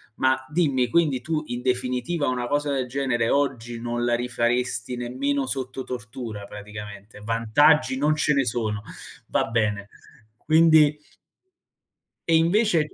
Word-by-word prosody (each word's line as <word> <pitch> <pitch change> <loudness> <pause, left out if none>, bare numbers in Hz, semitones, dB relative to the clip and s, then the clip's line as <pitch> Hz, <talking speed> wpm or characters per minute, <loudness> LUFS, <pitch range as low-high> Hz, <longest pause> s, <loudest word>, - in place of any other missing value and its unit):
Ma, 130 0 +3
dimmi, 140 -7 +1
quindi 150 -6 +2
,tu, 155 +1 -2
in 120 0 -4
definitiva, 130 +5 -1
una 125 -1 -1
cosa 145 +1 0
del 130 -2 -1
genere, 125 -3 0
oggi, 120 -5 -1
non 120 0 -3
la 120 - +1
rifaresti 120 0 -1
nemmeno 135 +3 -2
sotto 130 0 -4
tortura, 115 -3 -6
praticamente. 105 0 -10
Vantaggi 115 +6 +3
non 150 +3 +2
ce 155 0 +2
ne 135 -2 +2
sono. 110 -3 -2 0.4
Va - - +1
bene, 105 -3 -1 0.5
quindi 155 -1 +4 1.3
E 165 - +4
invece 170 -2 +2
125 Hz, 130 wpm, -24 LUFS, 120-145 Hz, 1.3 s, quindi